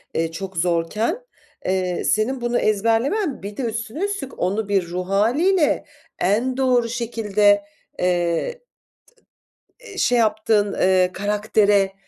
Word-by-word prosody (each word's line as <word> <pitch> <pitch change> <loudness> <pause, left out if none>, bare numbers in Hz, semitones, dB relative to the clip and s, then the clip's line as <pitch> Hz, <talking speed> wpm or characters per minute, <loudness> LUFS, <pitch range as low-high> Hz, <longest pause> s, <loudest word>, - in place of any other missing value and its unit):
eee, 165 0 0
çok 185 +2 -7
zorken, 180 - 0 0.5
eee, 185 -1 -1
senin 245 +5 0
bunu 240 0 0
ezberlemen 230 - 0
bir 205 +1 -7
de - - -2
üstüne 230 - -4
üstlük 400 -10 -5
onu 200 +3 -1
bir 195 -4 +1
ruh 180 +2 -4
hâliyle 290 - +2 0.3
en 235 +7 +1
doğru 250 -3 +2
şekilde, 210 -4 +1 0.4
eee, 180 - 0 1.2
t - - -18
eee, - - -11
şey 245 - +2
yaptığın, 215 -2 +2
eee, 185 -1 +3
karaktere, 205 -1 +1
210 Hz, 125 wpm, -21 LUFS, 190-240 Hz, 1.2 s, eee